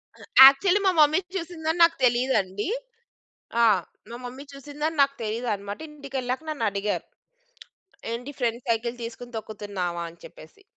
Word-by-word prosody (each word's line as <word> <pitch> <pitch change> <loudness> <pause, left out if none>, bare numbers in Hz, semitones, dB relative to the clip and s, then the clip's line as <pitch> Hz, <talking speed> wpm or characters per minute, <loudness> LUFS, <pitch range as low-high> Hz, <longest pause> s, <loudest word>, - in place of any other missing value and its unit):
ఆ! - - -18 0.3
యాక్చువల్లీ 370 +8 +1
మా 380 - +5
మమ్మీ 305 +3 +5 0.2
చూసిందని 335 -2 -3
నాకు 335 0 +5
తెలీదండి. 240 - +1 1.0
ఆ! - - +7 0.5
మా 235 - -6
మమ్మీ 255 +3 -8
చూసిందని 295 +3 -4
నాకు 275 0 +1
తెలీదన్నమాట. 210 -2 -3
ఇంటికెళ్ళాక 270 -2 -4
నన్నడిగారు. 210 -8 -2 1.1
"ఏంటి 245 +4 -5
ఫ్రెండ్ 235 -2 -1
సైకిల్ 230 +1 0
తీసుకొని 240 +1 -8
తొక్కుతున్నావా?" 200 -5 -4
అని 170 - -19
చెప్పేసి. 410 - -14
245 Hz, 125 wpm, -25 LUFS, 215-295 Hz, 1.1 s, ఆ